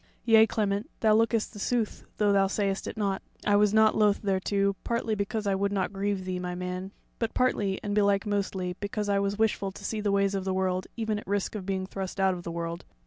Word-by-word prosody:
Yea, 225 Hz, -1 st, +7 dB
Clement, 205 Hz, -1 st, -1 dB
thou 220 Hz, -1 st, +5 dB
lookest 225 Hz, 0 st, +2 dB
the 205 Hz, -, -9 dB
sooth, 230 Hz, 0 st, -1 dB
though 210 Hz, -1 st, +3 dB
thou 195 Hz, -1 st, +4 dB
sayest 195 Hz, -1 st, -1 dB
it -, -, -6 dB
not, 200 Hz, -2 st, -1 dB, 0.2 s
I 205 Hz, -, +4 dB
was 205 Hz, 0 st, +4 dB
nought 220 Hz, 0 st, +5 dB
loth 210 Hz, -1 st, +3 dB
thereto, 200 Hz, 0 st, +1 dB
partly 235 Hz, -1 st, -1 dB
because 210 Hz, +1 st, -2 dB
I 200 Hz, -, +2 dB
would 200 Hz, +1 st, 0 dB
not 195 Hz, -1 st, -1 dB
grieve 195 Hz, -1 st, -2 dB
thee, 185 Hz, -1 st, -2 dB
my 180 Hz, 0 st, -4 dB
man; 180 Hz, +1 st, -4 dB, 0.3 s
but 230 Hz, -2 st, -2 dB
partly, 205 Hz, -6 st, +1 dB
and 205 Hz, -, -2 dB
belike 200 Hz, -1 st, +3 dB
mostly, 195 Hz, -3 st, -1 dB
because 205 Hz, 0 st, -3 dB
I 200 Hz, 0 st, +3 dB
was 200 Hz, 0 st, -1 dB
wishful 210 Hz, -3 st, +1 dB
to 200 Hz, +1 st, -10 dB
see 215 Hz, +1 st, -2 dB
the 205 Hz, -1 st, +1 dB
ways 200 Hz, 0 st, +2 dB
of 195 Hz, -1 st, -1 dB
the 190 Hz, 0 st, -1 dB
world 185 Hz, -1 st, 0 dB
even 220 Hz, -2 st, -1 dB
at -, -, -11 dB
the -, -, -13 dB
risk 200 Hz, -1 st, 0 dB
of 200 Hz, -3 st, -6 dB
being 190 Hz, -1 st, -1 dB
thrust 190 Hz, 0 st, -5 dB
out 190 Hz, -1 st, +3 dB
of 180 Hz, -, -6 dB
the 170 Hz, -, -6 dB
world. 170 Hz, +1 st, -4 dB
200 Hz, 240 wpm, -28 LUFS, 190-210 Hz, 0.3 s, Yea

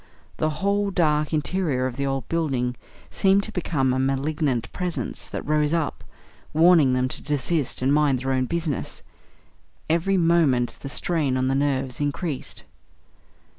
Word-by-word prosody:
The 155 Hz, +4 st, -2 dB
whole 200 Hz, 0 st, +2 dB
dark 155 Hz, -5 st, +1 dB
interior 155 Hz, -4 st, 0 dB
of 130 Hz, -2 st, -3 dB
the 140 Hz, +1 st, -2 dB
old 135 Hz, -2 st, -2 dB
building 135 Hz, -7 st, -1 dB, 0.4 s
seemed 195 Hz, +1 st, +3 dB
to -, -, -6 dB
become 135 Hz, -8 st, 0 dB
a 130 Hz, -, 0 dB
malignant 135 Hz, -2 st, -1 dB
Presence 180 Hz, -2 st, -4 dB
that -, -, -5 dB
rose 150 Hz, +1 st, +1 dB
up, 160 Hz, -3 st, -2 dB, 0.5 s
warning 160 Hz, -5 st, +5 dB
them 125 Hz, 0 st, +1 dB
to -, -, -2 dB
desist 145 Hz, -1 st, -1 dB
and 135 Hz, +2 st, +3 dB
mind 145 Hz, -3 st, +3 dB
their 135 Hz, +2 st, -3 dB
own 130 Hz, -1 st, +1 dB
business; 160 Hz, -1 st, -3 dB, 0.8 s
every 170 Hz, +4 st, +1 dB
moment 165 Hz, -8 st, +2 dB
the 140 Hz, -, -7 dB
strain 150 Hz, -5 st, 0 dB
on 130 Hz, 0 st, +1 dB
the -, -, +1 dB
nerves 135 Hz, -2 st, -1 dB
increased. 145 Hz, 0 st, -3 dB
145 Hz, 150 wpm, -24 LUFS, 130-165 Hz, 0.8 s, warning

